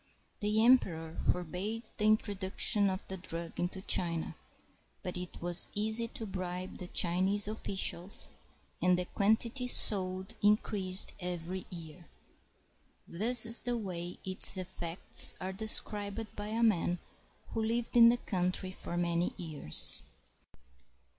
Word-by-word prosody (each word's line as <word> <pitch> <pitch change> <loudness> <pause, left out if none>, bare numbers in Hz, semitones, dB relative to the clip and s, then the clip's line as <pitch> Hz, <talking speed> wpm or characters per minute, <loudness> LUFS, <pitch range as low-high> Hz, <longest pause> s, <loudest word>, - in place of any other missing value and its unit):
The 215 +1 0
emperor 165 -10 +1
forbade 185 +6 -4
the 210 - -2
introduction 205 -1 0
of 190 0 -7
the 190 - -6
drug 170 -2 -8
into 180 +2 -5
China; 170 -4 0 0.7
but 180 - -6
it 180 0 -9
was 175 0 +3
easy 220 +2 +1
to 225 - -8
bribe 185 -2 -7
the 180 - -8
Chinese 185 +4 0
oflScials, 195 -3 -3 0.5
and 180 0 +1
the 180 - -4
quantity 225 +6 -1
sold 190 -3 -1
increased 205 -3 +1
every 180 0 -7
year. 170 -1 -12 1.0
This 225 +6 +6
is 230 +1 +7
the 245 0 -4
way 180 -5 -7
its 190 +1 +8
effects 175 -1 +5
are 190 +1 -6
described 210 +1 -2
by 205 0 -7
a 225 +2 -3
man 180 -5 0 0.5
who 225 - -5
lived 230 +2 -4
in 230 -1 +7
the 240 - 0
country 185 -3 -4
for 175 -2 -8
many 175 0 -2
years. 155 - 0
190 Hz, 125 wpm, -30 LUFS, 175-215 Hz, 1.0 s, its